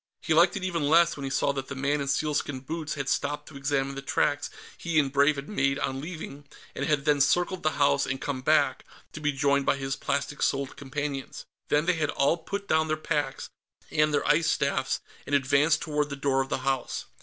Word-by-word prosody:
He 160 - +1
liked 175 +5 +5
it 190 - -6
even 170 -6 -1
less 170 +1 +5
when 140 - -6
he - - -2
saw 140 - +1
that 135 -1 -4
the 140 - -6
man 140 +2 0
in 140 - -3
sealskin 145 -2 -1
boots 155 +2 -4
had 140 -2 -4
stopped 145 +2 -1
to 155 - -14
examine 135 0 -1
the 135 - -6
tracks 145 +1 0 0.3
he 170 -2 -2
and 140 -3 +3
Brave 145 +1 +4
had 140 0 -6
made 140 -9 0
on 135 0 -2
leaving, 150 -3 -8 0.3
and 140 - -3
had 145 -2 +1
then 145 -2 +3
circled 175 +6 +2
the 155 - +1
house 70 - +2
and 130 0 -2
come 140 -3 -3
back, 135 -2 +2 0.3
to - - -7
be 145 -1 +1
joined 140 0 +1
by - - +4
his 135 -1 -3
plastic 145 +1 -2
soled 135 -1 0
companions. 140 0 -5 0.2
Then 150 +2 +2
they 180 - +3
had 155 -3 -1
all 145 +4 +2
put 200 +4 -5
down 160 0 +2
their 155 0 0
packs 145 -3 -2 0.4
and 150 0 +3
their 145 - 0
ice 160 +2 +3
staffs, 140 -2 0 0.3
and 145 - +1
advanced 140 +3 +3
toward 150 -2 -1
the 140 - -4
door 135 -1 +1
of 135 - -4
the - - 0
house. 135 -2 -1
145 Hz, 225 wpm, -27 LUFS, 135-155 Hz, 0.4 s, liked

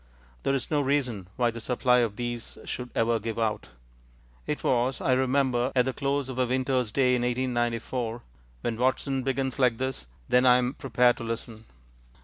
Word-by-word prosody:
There 135 - +1
is 135 - -3
no 150 -1 +3
reason 130 -9 -1
why 120 -2 +2
the 115 0 -7
supply 125 +1 +2
of 115 -4 0
these 120 0 -4
should 125 0 -5
ever 115 0 +2
give 115 +1 -4
out. 110 - -1 0.8
"It - - -3
was, 125 +1 +1
I 130 - +2
remember, 130 -1 +1
at 125 -1 +4
the 130 - -1
close 140 0 -1
of 130 -1 -5
a 125 - +2
winter's 130 -2 0
day 125 +2 +3
in 125 - +1
1894" 120 -1 -1 0.4
when 115 -2 -2
Watson 130 +2 0
begins 135 +1 -2
like 125 -3 +3
this, 130 - -4 0.2
then 125 0 +4
I 125 0 +7
am 125 +1 0
prepared 125 -3 +2
to - - -6
listen. 115 -1 -6
125 Hz, 180 wpm, -27 LUFS, 120-130 Hz, 0.8 s, I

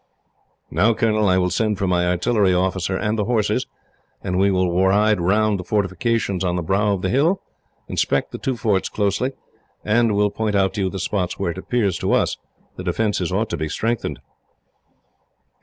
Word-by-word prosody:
"Now, 105 +8 +3
Colonel, 110 -2 +2
I 95 - +3
will 90 -1 +1
send 105 +2 0
for 100 - -1
my 90 -1 +1
artillery 95 +2 +2
officer 95 0 0
and 105 +2 -1
the 105 - +1
horses, 115 -3 0 0.6
and 90 -1 -1
we 100 +1 +4
will 90 -2 +1
ride 105 +1 +3
round 105 +3 +2
the - - -5
fortifications 100 0 -1
on 90 -1 0
the 90 - -2
brow 100 +5 +1
of 95 - -7
the 95 - 0
hill, 160 - +2 0.4
inspect - - 0
the - - -7
two 130 -2 -2
forts 105 -4 0
closely, 105 +6 -1 0.5
and 115 0 +2
will 105 0 +2
point 110 -1 -2
out 95 -1 +2
to 105 - -3
you 95 - +1
the 95 - -6
spots 90 -1 -2
where 95 -3 -1
it 90 - -7
appears 105 -3 0
to - - 0
us - - +1 0.4
the 90 - -6
defences 95 0 -1
ought 110 +4 -1
to - - -2
be 80 - -3
strengthened." 110 - -2
100 Hz, 190 wpm, -21 LUFS, 90-110 Hz, 0.6 s, we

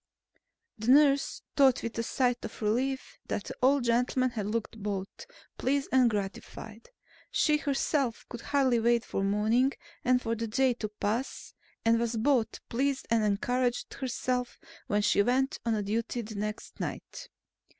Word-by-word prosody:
The 220 +3 -2
nurse 280 0 +4
thought 270 -3 +4
with 230 - -4
a - - +2
sigh 245 +2 +1
of - - -8
relief 260 +5 -1
that 205 - -2
the - - -7
old 270 +1 +4
gentleman 250 +2 +2
had 215 -4 -3
looked 225 0 -3
both 200 - -5 0.3
pleased 280 +2 0
and 255 -2 +5
gratified. 210 +2 -6 0.4
She 300 -1 +3
herself 275 -3 -1
could 240 -2 -8
hardly 265 -4 +2
wait 235 0 +2
for 195 - -2
morning, 220 +7 +2 0.3
and 250 0 +4
for 230 -2 -2
the 230 0 -3
day 255 +3 +2
to 220 -3 -5
pass, 215 +4 -3 0.3
and 230 0 +4
was 235 0 -1
both 240 0 +1
pleased 270 +3 -1
and 230 -1 +3
encouraged 245 +4 0
herself 250 -1 -2 0.3
when 205 0 +1
she 200 - +4
went 260 +5 +1
on 220 -2 +1
duty 230 +3 -2
the 215 +1 -8
next 210 +1 -5
night. - - -6
235 Hz, 155 wpm, -29 LUFS, 220-260 Hz, 0.4 s, and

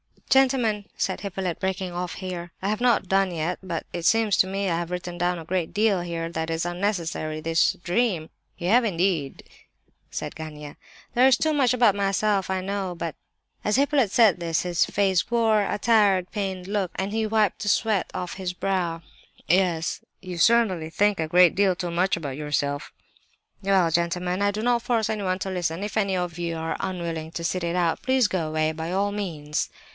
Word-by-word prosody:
"Gentlemen!" 250 -6 +3
said 190 - -1
Hippolyte, 190 -3 -3
breaking 190 -1 -2
off 175 0 -4
here, 175 -2 -6
"I 195 - -1
have 215 - -1
not 240 -6 +2
done 195 -1 +2
yet, 170 +1 -2
but 175 -4 -4
it 170 -1 -4
seems 225 -1 +3
to 185 - +4
me 195 +1 -2
that 180 - +1
I - - 0
have 170 -1 -4
written 180 -1 -5
down 175 +1 0
a 165 - -7
great 175 -1 -2
deal 205 -3 +2
here 165 -1 -4
that 160 -1 -3
is 165 +1 -1
unnecessary,—this 165 -4 0
dream—" 180 -4 0 0.3
"You 175 - -2
have 240 +3 +5
indeed!" 170 -7 -1 0.7
said - - -5
Gania. 150 -2 -8 0.4
"There 250 +2 +5
is 260 -2 +5
too 315 -1 +1
much 265 -4 +3
about 235 -4 +4
myself, 200 0 +1
I 190 0 0
know, 195 -1 -3
but—" 170 -2 -4 0.5
As 210 - +1
Hippolyte 275 -4 +3
said 210 -3 +4
this 165 -1 0
his 175 -2 +2
face 190 -3 +1
wore 225 -3 +3
a 205 - -1
tired, 205 -5 +3
pained 190 -4 -3
look, 195 -2 -1
and 190 +1 -2
he 220 0 0
wiped 215 -2 +1
the 205 - -4
sweat 205 -1 +1
off 180 - -4
his 185 -2 -4
brow. 180 -3 -1 0.5
"Yes," 175 -2 +3
said - - -3
Lebedeff, 185 - -17
"you 175 - -5
certainly 190 -5 +3
think 205 +3 +1
a 160 - 0
great 175 +1 +5
deal 195 -2 +3
too 175 -2 -4
much 180 +3 +1
about 140 -6 -5
yourself." 145 -1 -2 0.7
"Well—gentlemen—I 180 0 +1
do 215 +2 -4
not 240 0 +2
force 230 -3 0
anyone 195 -4 -1
to 190 - -3
listen! 175 0 -2
If 210 +1 -4
any 195 -3 +1
of 175 -2 -3
you 170 -1 -2
are 160 0 -3
unwilling 170 -4 -4
to 170 - -4
sit 175 +1 -1
it 170 +1 -1
out, 170 -2 +1
please 260 -4 +2
go 170 -4 -1
away, 155 0 0
by 160 +2 -5
all 200 +2 +1
means!" 160 -8 -3
185 Hz, 195 wpm, -25 LUFS, 170-205 Hz, 0.7 s, have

